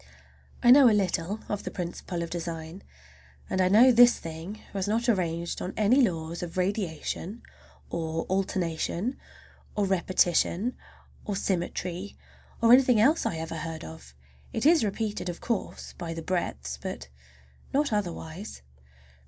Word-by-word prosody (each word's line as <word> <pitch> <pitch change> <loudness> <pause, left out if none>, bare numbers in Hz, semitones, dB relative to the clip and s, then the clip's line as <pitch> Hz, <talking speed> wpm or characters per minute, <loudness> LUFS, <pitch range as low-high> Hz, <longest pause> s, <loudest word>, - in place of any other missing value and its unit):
I 240 - +7
know 265 -1 +9
a - - +3
little 190 +1 -1
of 205 - -3
the - - -4
principle 175 -1 -4
of 165 - -7
design, 170 +1 -5 0.7
and 190 - +1
I 185 - +4
know 235 +6 +7
this 245 0 +7
thing 165 +6 -7
was 195 -1 -2
not 225 +4 0
arranged 170 -6 0
on 180 - -5
any 220 +6 +4
laws 170 -6 -1
of 175 0 -6
radiation, 190 +2 -2 0.5
or 165 -1 -2
alternation, 190 +3 -1 0.6
or 205 - +1
repetition, 185 +3 +1 0.5
or 205 - -3
symmetry, 180 0 -3 0.5
or 230 +1 +7
anything 250 -3 +6
else 290 +9 +4
that 225 - 0
I - - -5
ever 160 0 -5
heard 160 0 -5
of. 70 -5 -11 0.4
It 225 - -2
is 320 -4 +6
repeated, 210 -2 -2
of 175 - -5
course, 230 -5 -4
by 165 -1 -6
the 165 - -6
breadths, 70 - -3
but 65 +1 -6 0.6
not 280 -3 +1
otherwise. 180 - -4
185 Hz, 145 wpm, -27 LUFS, 165-215 Hz, 0.7 s, know